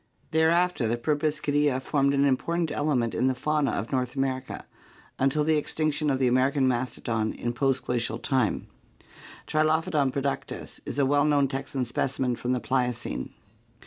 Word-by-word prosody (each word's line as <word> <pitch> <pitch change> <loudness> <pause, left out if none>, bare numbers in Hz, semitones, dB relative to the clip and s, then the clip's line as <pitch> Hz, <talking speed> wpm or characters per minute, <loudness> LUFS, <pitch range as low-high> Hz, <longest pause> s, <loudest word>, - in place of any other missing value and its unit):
Thereafter 165 -3 +2
the 115 +2 0
Proboscidea 145 0 +1
formed 140 +1 +1
an 140 0 +3
important 165 +5 0
element 125 -7 0
in 125 +8 +1
the 130 - +1
fauna 150 +1 0
of 110 - -3
North 125 -1 -1
America 135 -1 -3 0.5
until 135 +3 +2
the 155 0 +3
extinction 155 0 -1
of 135 - +2
the 130 - +1
American 130 +2 +3
mastodon 120 -3 -1
in 120 0 -3
post 135 +1 0
Glacial 120 -2 -1
time. 130 -3 0 0.8
Trilophodon 155 -2 +1
productus 140 +1 -4
is - - -4
a 140 - +3
well 145 +1 +3
known 145 -2 +3
Texan 135 -1 -3
specimen 125 +1 -1
from 120 +1 -3
the 125 - +1
Pliocene. 125 - -2
135 Hz, 150 wpm, -27 LUFS, 125-150 Hz, 0.8 s, an